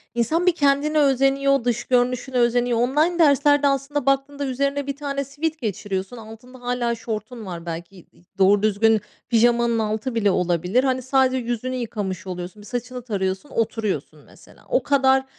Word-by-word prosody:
insan 315 +10 +1
bir 360 -2 +3
kendine 290 +1 +2
özeniyor, 275 -1 +3
dış 240 0 -1
görünüşüne 250 +1 0
özeniyor. 240 0 +2
Online 305 +8 +1
derslerde, 290 -1 +4
aslında 275 0 -1
baktığında, 275 +1 0
üzerine 280 +2 -1
bir 280 - -3
tane 280 -1 -3
sweat 300 +4 -3
geçiriyorsun. 200 - -4
Altında 230 +3 -12
hâlâ 245 -1 -1
şortun 220 0 -6
var 175 -2 -7
belki 170 +3 -6
i 175 - -19
i - - -24
doğru 200 +1 +4
düzgün 215 0 +3 0.3
pijamanın 235 0 +3
altı 220 +3 -2
bile 205 -3 +2
olabilir. 180 +7 +1
Hani 260 -1 0
sadece 260 0 +2
yüzünü 245 +1 -3
yıkamış 200 -6 -4
oluyorsun. 180 +3 -7
Bir 205 - -13
saçını 250 +1 -5
tarıyorsun, 195 +2 -3
oturuyorsun 225 -2 -2
mesela. - - -19
O - - +2
kadar 265 -1 +3
245 Hz, 160 wpm, -22 LUFS, 215-275 Hz, 0.3 s, derslerde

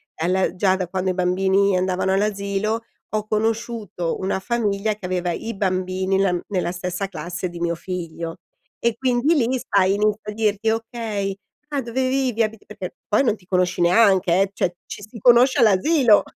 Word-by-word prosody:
alla 180 +4 0
già 185 0 +2
da 185 -2 -3
quando 185 0 -1
i - - -2
bambini 190 +2 +2
andavano 185 +1 0
all'asilo 200 +2 0 0.3
ho 215 0 -2
conosciuto 215 -5 -2
una 190 0 -1
famiglia 215 -2 0
che 205 - -10
aveva 180 -1 -1
i 225 +7 -4
bambini 185 0 0
la 195 -2 +2
mhmm, 175 - -2
nella 180 -3 -1
stessa 180 +2 -3
classe 175 +1 -5
di 175 -1 -9
mio 170 0 0
figlio 170 -2 -6 0.4
e 235 -1 0
quindi 255 +5 +2
lì, 250 -7 +2 0.2
sai, 195 -1 +4
inizi 210 +1 +1
a 210 - -5
dirti: 215 0 0
"Okay. 220 -3 -2 0.4
Ah 285 -2 -1
dove 255 +2 -1
vivi? 255 -4 +1
Abiti" 220 -1 -4
Perché 190 -4 -7
poi 215 +4 +3
non 225 -4 +1
ti 180 - -23
conosci 180 -1 0
neanche, 185 0 +4
eh, 195 0 +1
cioè 175 -2 -1
ci - - -8
si 215 +4 -11
conosce 245 +5 +5
all'asilo. 230 - +5
200 Hz, 175 wpm, -22 LUFS, 185-225 Hz, 0.4 s, conosce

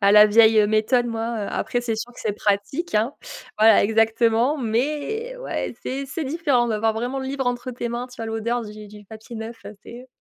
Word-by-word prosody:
à 200 -1 +4
la 210 +1 +8
vieille, 220 +1 +5
heu, 210 - +5
méthode, 220 +4 +2
moi, 230 -1 -3
heu, - - -5
après, 245 - -1
c'est 235 -2 -2
sûr 230 +3 -6
que - - -17
c'est 215 - -1
pratique, 210 - -1
hein. 230 +7 0 0.4
Voilà, 220 -1 +6
exactement, 225 +5 +2
mais 295 - -2
ouais, - - -4
c'est 270 +2 -3
c'est 285 +4 -5
différent 280 -4 +1
d'avoir 220 0 +1
vraiment 245 +4 -3
le 265 - -5
livre 270 -1 -3
entre 245 +1 -2
tes 240 -1 -4
mains. 240 +2 -4
Tu 250 -1 -12
as 225 - -3
l'odeur 225 +2 -2
du 210 0 -10
du 210 0 -13
papier 220 +3 -11
neuf, 225 +1 -8 0.2
c'est 245 +2 -11
230 Hz, 210 wpm, -23 LUFS, 220-255 Hz, 0.4 s, la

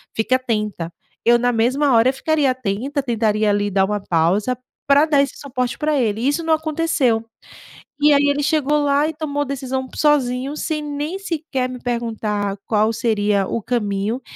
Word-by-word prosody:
fique 220 +3 0
atenta.", 210 -9 -1 0.3
eu, 240 0 +6
na 245 +1 +2
mesma 260 +5 +2
hora 235 +3 +4
ficaria 290 0 +1
atenta, 255 +4 -2
tentaria 220 -3 +1
ali 205 0 +1
dar 190 0 +3
uma 210 +1 -2
pausa 195 +7 +1 0.3
pra 285 +2 +5
dar 285 -3 +4
esse 280 - -4
suporte 255 -3 -3
pra 300 -2 +1
ele, 220 -3 0
e 250 - +1
isso 290 +4 0
não 325 0 +2
aconteceu. 310 -7 0 0.7
E 295 0 +5
aí 285 0 +4
ele 285 0 0
chegou 295 0 +1
lá 285 0 +2
e - - -5
tomou 295 -2 -3
a - - 0
decisão 265 -1 -3
p 260 - -13
sozinho, 275 -2 +1
sem 305 0 -2
nem 295 +5 -4
sequer 310 -8 -3
me 255 - -6
perguntar 220 -4 -2
qual 215 0 +2
seria 210 -4 +1
o 230 - -3
caminho. 210 0 -2
255 Hz, 180 wpm, -20 LUFS, 220-290 Hz, 0.7 s, eu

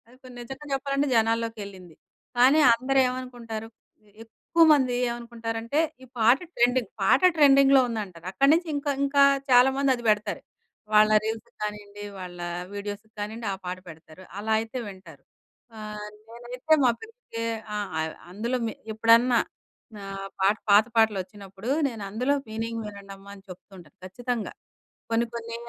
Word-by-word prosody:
ఇప్పుడు 255 -1 -14
నిజంగా 270 +4 -9
చెప్పాలంటే 275 +1 0
జనాల్లోకెళ్ళింది. 220 -6 -2 0.4
కానీ 265 +5 +6 0.2
అందరూ 265 +3 +1
ఏమనుకుంటారు, 240 -3 -6 0.6
ఎక్కువమంది 290 +1 +3
ఏమనుకుంటారంటే 235 +2 -3 0.2
ఈ - - -11
పాట 235 +4 +5 0.2
ట్రెండింగ్. 245 -2 +2
పాట 195 - +4 0.2
ట్రెండింగ్‌లో 275 -2 +6
ఉందంటారు. 195 -7 -6
అక్కడి 275 +8 +4
నుంచి 340 +1 +1
ఇంకా, 285 0 -1
ఇంకా 280 0 +4 0.3
చాలామంది 265 +2 +5
అది 240 - -10
పెడతారు. 210 0 0 0.5
వాళ్ళ 215 0 +7 0.2
రీల్స్‌కి 220 0 -5
కానియండి, 205 -1 -6
వాళ్ళ 180 -1 -8 0.4
వీడియోస్‌కి 205 +1 -6
కానియ్యండి 220 +2 -5
ఆ - - -3
పాట 180 +1 -4
పెడతారు. 160 +2 -14 0.2
అలా 220 +2 -1
అయితే 225 +3 -5
వింటారు. 185 -5 -11 0.7
ఆహ్, 210 -1 -7 0.2
నేనైతే 245 +6 -2
మా 250 - +5
పిల్లలకి 445 - -8 0.3
ఆహ్, 205 -1 -3
ఆహ్, 160 0 -3 0.2
అందులో 235 +6 -2
మె 220 - -4 0.2
ఎప్పుడన్నా 230 +3 +4 0.7
ఆహ్, 195 0 -6
పాట 195 +2 +4
పాత 205 +2 +7
పాటలొచ్చినప్పుడు, 200 0 -1 0.2
నేనందులో 225 +5 -2
మీనింగ్ 225 +1 -4
వినండమ్మా 200 -1 -11
అని 195 - -16
చెప్తూ 185 +2 -12
ఉంటాను 160 -5 -16
ఖచ్చితంగా. 235 +4 -4 0.6
కొన్ని 230 +1 +2
కొన్ని 230 0 -6
225 Hz, 130 wpm, -26 LUFS, 205-255 Hz, 0.7 s, వాళ్ళ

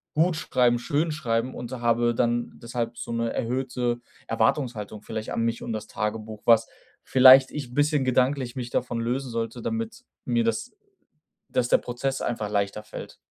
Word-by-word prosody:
gut 165 +3 +3
schreiben, 120 -4 +2
schön 150 +6 0
schreiben“, 125 -4 -1
und 120 - -6
habe 120 -1 +1
dann 120 0 0
deshalb 115 0 -4
so - - -6
'ne 115 0 -1
erhöhte 125 0 -1 0.3
Erwartungshaltung 115 -2 0
vielleicht 110 0 -5
an - - -1
mich 115 0 -1
und - - -4
das 110 0 -4
Tagebuch, 110 0 -4
was 115 -1 +5 0.4
vielleicht 130 0 +8
ich 135 -5 -6
bisschen 145 -1 +2
gedanklich 130 0 +1
mich 120 -2 -5
davon 120 -1 -1
lösen 125 +3 -2
sollte, 115 +1 -3
damit 225 - -4 0.2
mir 120 -2 +2
das 115 - -1 0.8
dass 125 -1 +1
der - - +5
Prozess 130 +2 -3
einfach 110 -3 -2
leichter 100 0 -1
fällt. - - -9
120 Hz, 160 wpm, -26 LUFS, 115-130 Hz, 0.8 s, vielleicht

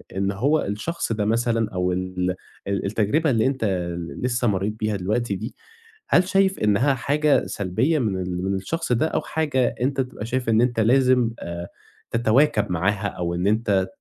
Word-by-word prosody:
إن 100 +1 0
هو 140 +10 +1
الشخص 110 +8 -3
ده 105 -2 0
مثلًا 115 0 +1
أو 90 0 0
ال 90 0 -2 0.3
ال 100 0 -1
التجربة 110 +10 +1
اللي 115 -4 +2
أنت 130 -4 0 0.3
ل 85 - -7
لسه 120 -1 0
مرّيت 100 0 0
بيها 110 -1 0
دلوقتي 100 +3 -1
دي، 110 +7 -6 0.5
هل 180 0 +4
شايف 195 0 +2
إنّها 105 +7 +3
حاجة 145 +3 +2
سلبية 110 - 0
من 95 -6 -1
ال 90 0 -3
من 95 0 0
الشخص 145 - -3
ده 125 +6 +2
أو 155 - -1
حاجة 150 -6 0
أنت 135 +1 +1
تبقى 125 -4 -6
شايف 120 0 -2
إن 110 +1 +4
أنت 120 -2 +1
لازم 125 0 +4
آآ، 85 0 -6 0.4
تتواكب 120 0 +2
معاها 100 +4 0
أو 85 -3 -3
إن 90 +2 0
أنت 105 -3 +2
110 Hz, 175 wpm, -23 LUFS, 95-130 Hz, 0.5 s, هل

